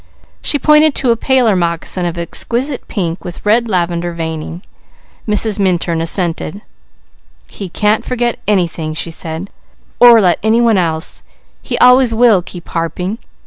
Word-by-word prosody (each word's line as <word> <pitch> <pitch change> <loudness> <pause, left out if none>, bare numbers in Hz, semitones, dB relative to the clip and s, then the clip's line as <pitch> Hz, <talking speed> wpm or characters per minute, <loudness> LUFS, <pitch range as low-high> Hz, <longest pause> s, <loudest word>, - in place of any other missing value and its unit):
She 290 - +1
pointed 300 +1 +4
to 255 -3 +2
a - - +3
paler 245 -3 +2
moccasin 175 +1 -1
of 170 0 -5
exquisite 245 - -2
pink 175 -4 -3
with 175 +2 -9
red 230 +2 +2
lavender 175 -2 -1
veining. 165 +1 -5 0.6
Mrs. 210 0 +1
Minturn 175 -3 0
assented. 170 +2 -2 0.8
"He 195 -3 -8
can't 210 +4 +1
forget 240 -1 -2
anything," 170 -6 -1
she 165 +1 -4
said, 165 +3 -5 0.5
"or 240 -2 +8
let 180 -4 +2
any 220 +3 +2
one 230 -4 +3
else. 160 -2 -2 0.4
He - - -3
always 250 -2 +5
will 225 -5 +4
keep 175 -1 -11
harping." 180 +6 -3
190 Hz, 145 wpm, -14 LUFS, 170-230 Hz, 0.8 s, or